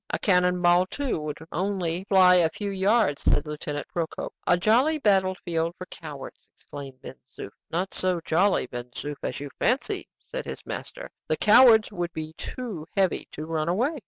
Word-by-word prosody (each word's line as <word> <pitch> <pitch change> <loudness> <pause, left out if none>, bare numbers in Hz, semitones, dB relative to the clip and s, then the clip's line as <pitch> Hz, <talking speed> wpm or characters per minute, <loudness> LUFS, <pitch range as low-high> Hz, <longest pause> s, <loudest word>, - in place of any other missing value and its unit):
A - - -1
cannon 180 -2 +2
ball, 175 +1 +5
too, 275 - -2
would 150 -1 -5
only 185 -1 -2
fly 185 -2 +6
a 170 -2 +4
few 200 +4 -5
yards," 195 -4 +2
said - - +2
Lieutenant 150 -1 -5
Procope. 165 -2 -3
"A 175 - +5
jolly 245 - +3
battle 190 -7 +2
field 165 -1 -1
for 185 - -7
cowards!" 145 -5 -10
exclaimed 135 -2 -10
Ben - - -8 0.2
Zoof. 100 - -7 0.2
"Not 180 +4 -2
so 185 -2 0
jolly, 185 +2 +2
Ben 120 0 -7
Zoof, 145 +4 -6
as - - -4
you 145 -1 -7
fancy," 280 - 0
said - - -7
his - - -7
master; - - -7 0.2
"the - - 0
cowards 220 -1 +6
would 175 -3 -4
be 155 0 -6
too 195 -4 -7
heavy 190 -2 +1
to 155 - -6
run 160 0 -1
away." 255 - 0
180 Hz, 180 wpm, -26 LUFS, 160-205 Hz, 0.2 s, fly